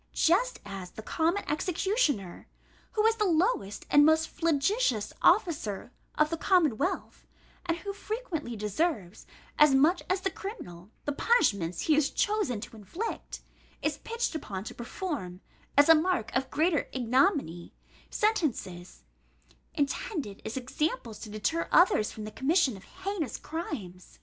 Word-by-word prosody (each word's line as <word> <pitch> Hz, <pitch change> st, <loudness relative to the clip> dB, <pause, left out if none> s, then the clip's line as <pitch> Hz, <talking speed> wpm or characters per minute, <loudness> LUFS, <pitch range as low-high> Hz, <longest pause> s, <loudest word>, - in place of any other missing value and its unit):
Just 475 Hz, +10 st, +2 dB
as 195 Hz, -2 st, -7 dB
the 220 Hz, -, -10 dB
common 335 Hz, -, 0 dB
executioner, 310 Hz, -, 0 dB, 0.5 s
who 425 Hz, 0 st, +2 dB
is 450 Hz, 0 st, +4 dB
the 425 Hz, -, +1 dB
lowest 340 Hz, -, +1 dB
and 290 Hz, -, +7 dB
most 315 Hz, +1 st, +4 dB
flagitious 325 Hz, -, +1 dB
officer 295 Hz, -, +2 dB, 0.3 s
of 305 Hz, +1 st, +3 dB
the 330 Hz, -, -1 dB
commonwealth, 350 Hz, -, +1 dB, 0.4 s
and 335 Hz, -1 st, +1 dB
who 400 Hz, +3 st, -5 dB
frequently 395 Hz, -, -4 dB
deserves, 210 Hz, -, -2 dB, 0.3 s
as 300 Hz, -2 st, +7 dB
much 315 Hz, +7 st, +4 dB
as 375 Hz, +1 st, +1 dB
the 385 Hz, -, -1 dB
criminal, 185 Hz, -, -8 dB, 0.2 s
the 290 Hz, -, 0 dB
punishment 200 Hz, -, +2 dB
he 315 Hz, -, +3 dB
is 300 Hz, -2 st, +3 dB
chosen 410 Hz, -, 0 dB
to 230 Hz, -, -9 dB
inflict, 280 Hz, -, -6 dB, 0.4 s
is -, -, -1 dB
pitched 465 Hz, -2 st, -2 dB
upon 200 Hz, -11 st, -5 dB
to -, -, -7 dB
perform, 240 Hz, -, -5 dB, 0.4 s
as 285 Hz, -, +7 dB
a 325 Hz, -, +10 dB
mark 315 Hz, -9 st, 0 dB
of 265 Hz, +1 st, 0 dB
greater 315 Hz, +1 st, +1 dB
ignominy, 255 Hz, -, +1 dB, 0.4 s
sentences 230 Hz, -, -1 dB, 0.7 s
intended 285 Hz, -, -2 dB
as 220 Hz, -, -5 dB
examples 255 Hz, -3 st, -2 dB
to 215 Hz, -, -8 dB
deter 215 Hz, +11 st, -1 dB
others 345 Hz, -, +4 dB
from 215 Hz, -, -8 dB
the 215 Hz, -, -6 dB
commission 275 Hz, -, +2 dB
of 195 Hz, -, -13 dB
heinous 375 Hz, -, -4 dB
crimes. 245 Hz, -, -7 dB
300 Hz, 140 wpm, -29 LUFS, -, 0.7 s, a